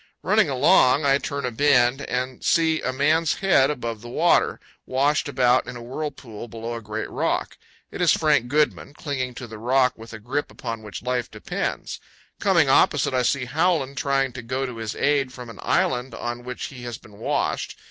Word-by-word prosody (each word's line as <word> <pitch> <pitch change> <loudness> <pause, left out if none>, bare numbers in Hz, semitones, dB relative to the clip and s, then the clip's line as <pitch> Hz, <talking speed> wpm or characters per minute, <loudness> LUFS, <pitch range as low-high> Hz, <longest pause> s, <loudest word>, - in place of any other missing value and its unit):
Running - - +3
along, 140 +4 +4
I 140 0 +4
turn 140 -2 -4
a 125 - -2
bend 130 0 +3
and 130 -1 -3
see 160 -1 +2
a - - -1
man's 155 +4 +2
head 180 -9 +3
above 115 -6 -4
the 120 - -9
water, 165 +7 +2 0.3
washed 145 +3 +1
about 125 -2 +3
in 120 - -6
a 120 - -9
whirlpool 125 -4 -6
below 115 +1 -6
a 115 - -5
great 110 0 -4
rock. - - -1 0.4
It - - -6
is 175 - +5
Frank 150 -6 +2
Goodman, 145 +1 0
clinging 130 -6 -4
to 125 - -7
the 110 -2 -10
rock 125 +2 +3
with 115 +1 -11
a 110 - -7
grip 130 +7 -3
upon 115 -2 -6
which 105 0 -8
life 125 -1 -1
depends. 110 - -4 0.4
Coming - - +3
opposite, - - +3
I 130 - +2
see 125 +1 +1
Howland 155 -1 +1
trying 135 -1 0
to 125 - -6
go 130 +3 -2
to 125 -3 -6
his 110 -2 -4
aid 140 -3 +1
from 125 -3 -9
an - - -14
island 125 -1 0
on 120 +1 -5
which 125 0 -6
he 125 - -10
has 120 -2 -6
been 105 -1 -17
washed. - - -1
125 Hz, 195 wpm, -24 LUFS, 120-140 Hz, 0.4 s, is